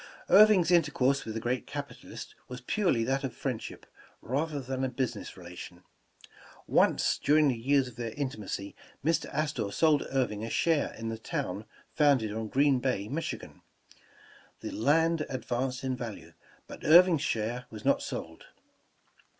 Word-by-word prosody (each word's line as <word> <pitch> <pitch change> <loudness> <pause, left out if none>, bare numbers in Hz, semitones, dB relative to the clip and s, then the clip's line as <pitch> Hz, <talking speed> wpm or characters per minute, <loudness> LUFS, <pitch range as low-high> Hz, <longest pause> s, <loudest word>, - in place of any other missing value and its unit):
Irving 205 -2 +7
's 170 - 0
intercourse 140 -5 +2
with 110 - -5
the - - -1
great 120 +1 -2
capitalist - - -8
was 125 0 -7
purel}^ 130 - +1
that 135 +3 0
of 130 -4 -4
friendship, 130 -5 -5 0.3
rather 145 +4 -2
than 130 0 -3
a 130 - 0
business 125 -3 -3
rela 90 -1 -11
tion. 90 0 -10 0.8
Once - - +2
during 150 0 +5
the 130 - 0
years 135 +3 +2
of 125 - -12
their 120 -1 -3
intimacy, 105 -7 -4 0.3
Mr. 165 0 +1
Astor 145 -8 -2
sold 155 +4 +2
Irving 120 -6 0
a 115 - -4
share 160 +4 +1
in 115 0 -4
a 115 - -5
town 105 -1 -4 0.3
founded 135 -8 +3
on 110 0 -3
Green 135 +2 +3
Bay, 125 -5 -1
Michigan. 165 +5 -5 1.0
The - - -5
land 160 +6 +2
advanced 130 0 -3
in 130 -1 -1
value, 120 -5 -7 0.3
but - - -11
Irving 170 0 +7
's - - -4
share 115 +3 -2
was 110 -2 -10
not - - +3
sold. - - -6
130 Hz, 160 wpm, -29 LUFS, 115-150 Hz, 1.0 s, Irving